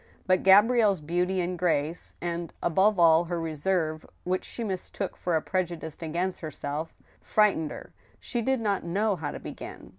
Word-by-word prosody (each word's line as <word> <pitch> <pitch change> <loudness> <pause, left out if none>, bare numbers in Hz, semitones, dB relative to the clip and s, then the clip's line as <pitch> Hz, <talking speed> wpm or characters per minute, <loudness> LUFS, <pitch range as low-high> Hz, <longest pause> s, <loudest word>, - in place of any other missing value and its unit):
But 185 -1 +3
Gabrielle's 205 0 +5
beauty 180 +4 0
and 175 0 -3
grace, 165 -2 0
and, 170 -1 -3
above 190 +5 +3
all, 165 0 +6
her 170 0 -2
reserve, 160 0 -1 0.2
which 185 +1 -1
she 235 - -5
mistook 195 -1 -4
for 175 -2 -1
a 160 - +1
prejudice 170 -4 -3
against 175 +3 -2
herself, 155 0 -4 0.3
frightened 205 -8 +2
her. - - -10 0.3
She 240 - -2
did 265 +1 0
not 205 -3 0
know 200 +5 +1
how 155 -4 -4
to - - -6
begin. - - -9
175 Hz, 160 wpm, -27 LUFS, 160-195 Hz, 0.3 s, all